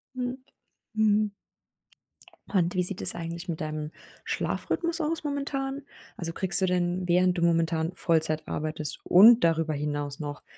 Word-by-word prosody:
Hm. 250 0 -3 0.6
Mhm. 215 -1 +2 1.2
Und 180 -2 +2
wie 180 - +2
sieht 185 +1 -3
es 180 - 0
eigentlich 170 +1 -6
mit 160 - -3
deinem 155 0 -4 0.3
Schlafrhythmus 340 0 -2
aus 320 +1 -2
momentan? 275 -1 -3 0.3
Also, 165 -1 -4
kriegst 185 +1 0
du 190 - +4
denn, 180 0 0
während 180 +1 +3
du - - -1
momentan 165 -1 +1
Vollzeit 160 -3 0
arbeitest 155 -1 -3
und 225 +5 +7
darüber 165 -1 +2
hinaus 145 -1 -3
noch 145 -2 -6
175 Hz, 140 wpm, -27 LUFS, 160-210 Hz, 1.2 s, und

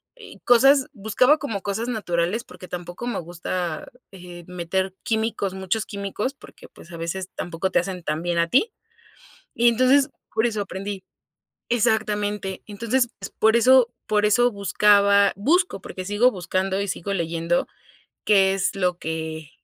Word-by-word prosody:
eh, 470 -3 -13
cosas 270 +3 +5
buscaba 245 +7 +3
como 220 -9 -4
cosas 215 +4 -2
naturales 200 -1 -1
porque 180 - -13
tampoco 175 +5 -7
me 245 - -2
gusta, 175 -1 -4 0.2
eh, 175 -2 -11
meter 180 +2 -2
químicos, 220 -3 -1
muchos 190 +3 -2
químicos 200 +5 -4
porque, - - -15
pues, 170 - -16
a 170 - -8
veces 180 +3 -4
tampoco 175 +2 -3
te - - +3
hacen 180 +1 -4
tan 155 0 -2
bien 175 -1 -1
a 170 - +2
ti 410 - +3 0.8
y, 240 +1 +4
entonces, 255 +4 +4 0.2
por 225 +2 +2
eso 215 -3 -2
aprendí 195 0 -6 0.7
exactamente, 210 -4 0
entonces, 230 +4 0
pues, 195 - -7
por 220 +1 +4
eso 245 +1 +5 0.2
por 210 0 +2
eso 240 +3 +3
buscaba 200 0 +4
busco 320 - +1
porque 185 0 -7
sigo 205 +6 +3
buscando 190 0 -2
y 200 - -2
sigo 195 +1 -4
leyendo 170 -1 -1 0.6
qué 195 -2 +4
es 195 -1 -1
lo 180 -2 0
que 160 -1 -5
200 Hz, 155 wpm, -23 LUFS, 180-230 Hz, 0.8 s, cosas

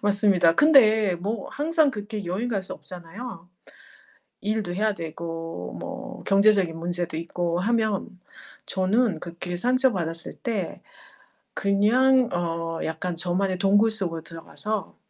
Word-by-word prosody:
맞습니다. 200 -5 +4
근데 220 - +5
뭐 200 +4 -4
항상 310 0 +2
그렇게 210 -2 -6
여행 195 +8 -2
갈 200 -5 -1
수 - - -7
없잖아요, 180 +1 -9 0.9
일도 210 -4 -2
해야 215 +1 +1
되고 165 - -6
뭐 - - -7
경제적인 195 -4 +4
문제도 175 -1 -3
있고 170 +1 -2
하면. 220 +1 0 0.6
저는 195 0 +1
그렇게 175 +1 -6
상처 255 +6 +3
받았을 165 -2 -3
때, 215 -7 -3 0.7
그냥 240 +6 +3
어 165 -1 -2
약간 160 +2 -3
저만의 180 +2 -1
동굴 205 +4 +4
속으로 175 -7 0
들어가서 170 +4 -5
195 Hz, 260 characters per minute, -25 LUFS, 170-220 Hz, 0.9 s, 근데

